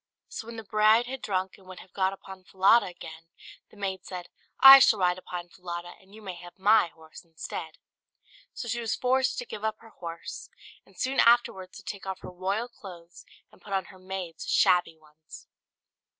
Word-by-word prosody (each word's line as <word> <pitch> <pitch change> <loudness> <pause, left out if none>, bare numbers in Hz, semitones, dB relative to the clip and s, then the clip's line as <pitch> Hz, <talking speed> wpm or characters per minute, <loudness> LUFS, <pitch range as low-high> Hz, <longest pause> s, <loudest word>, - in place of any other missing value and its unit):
So 225 - -7
when 235 - -8
the 225 - -7
bride 215 +3 +4
had 260 +1 -6
drunk, 190 -1 -3
and 190 - -20
would 185 -1 -10
have 185 - -16
got 190 -1 +1
upon 190 -1 -11
Falada 195 +4 +4
again, 165 -2 -11 0.4
the - - -19
maid 190 -2 -4
said, 180 -1 -8 0.3
"I 270 0 +12
shall 225 - +5
ride 180 -1 +1
upon 175 -1 -7
Falada 175 -1 -7
and 195 +2 -18
you 220 - -13
may 190 -2 -6
have 175 +2 -13
my 210 0 +4
horse 160 -1 -15
instead;" 165 -1 -8 0.7
so 240 - -7
she 240 +1 -2
was 225 -2 -1
forced 260 +1 +1
to 245 - -4
give 210 - -8
up 220 0 -1
her 225 - -15
horse, 170 -1 -8 0.4
and - - -23
soon 265 +1 -1
afterwards 230 -6 +3
to - - -12
take 200 -1 -7
off 190 - -5
her - - -9
royal 195 +6 -2
clothes, 175 -7 -13 0.3
and - - -22
put 200 - -8
on 190 -1 0
her 185 - -16
maid's 185 -3 -7
shabby 175 -2 +3
ones. 155 0 -15
190 Hz, 195 wpm, -27 LUFS, 175-220 Hz, 0.7 s, I